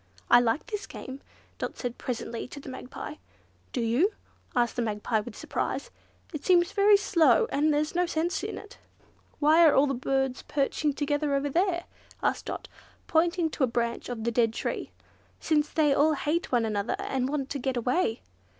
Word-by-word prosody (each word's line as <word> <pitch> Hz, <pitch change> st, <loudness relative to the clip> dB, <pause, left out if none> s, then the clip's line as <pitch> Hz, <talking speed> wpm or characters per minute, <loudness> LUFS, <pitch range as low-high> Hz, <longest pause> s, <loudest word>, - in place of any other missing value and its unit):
"I 240 Hz, -, +9 dB
like 240 Hz, +4 st, +1 dB
this 420 Hz, -3 st, -5 dB
game," 265 Hz, +2 st, -8 dB, 0.4 s
Dot -, -, -3 dB, 0.2 s
presently 235 Hz, -2 st, -4 dB
said -, -, -15 dB
to 285 Hz, -, -7 dB
the 275 Hz, -, -9 dB
Magpie. 260 Hz, +3 st, -7 dB, 0.5 s
"Do 250 Hz, -, -2 dB
you?" 245 Hz, -, +2 dB, 0.4 s
said 240 Hz, -1 st, +3 dB
the 245 Hz, -, -3 dB
Magpie 215 Hz, 0 st, 0 dB
with 215 Hz, +1 st, -7 dB
surprise. -, -, -3 dB, 0.4 s
"It 300 Hz, -, -5 dB
seems 350 Hz, -1 st, +4 dB
to -, -, -18 dB
me 400 Hz, -, +1 dB
very 410 Hz, 0 st, +8 dB
slow, 400 Hz, +2 st, +4 dB
and 305 Hz, +2 st, +2 dB
there's 300 Hz, +1 st, 0 dB
no 355 Hz, 0 st, +1 dB
sense 335 Hz, +3 st, -1 dB
in -, -, -4 dB
it." -, -, -12 dB, 0.6 s
"Why 315 Hz, +3 st, +5 dB
are 290 Hz, -3 st, +6 dB
the 275 Hz, -, -1 dB
birds 265 Hz, 0 st, -1 dB
all -, -, -27 dB
perching 290 Hz, +1 st, +1 dB
together 290 Hz, 0 st, 0 dB
over 280 Hz, +1 st, -1 dB
there?" 345 Hz, +1 st, +1 dB, 0.4 s
asked -, -, 0 dB
Dot, -, -, -5 dB, 0.4 s
pointing 335 Hz, 0 st, +2 dB
to 290 Hz, -, -1 dB
a -, -, +4 dB
branch 235 Hz, 0 st, -2 dB
of 235 Hz, -3 st, -4 dB
the 235 Hz, -, 0 dB
dead 230 Hz, -1 st, +2 dB
tree, -, -, -3 dB, 0.5 s
"since 300 Hz, -1 st, +1 dB
they 300 Hz, -3 st, +3 dB
all 300 Hz, +3 st, +4 dB
hate 305 Hz, +4 st, -1 dB
one 240 Hz, -3 st, +2 dB
another 210 Hz, 0 st, -1 dB
and 260 Hz, -1 st, -2 dB
want 275 Hz, -2 st, -2 dB
to 280 Hz, -, -2 dB
get 260 Hz, 0 st, -1 dB
away. 245 Hz, +1 st, 0 dB
280 Hz, 190 wpm, -28 LUFS, 245-320 Hz, 0.6 s, I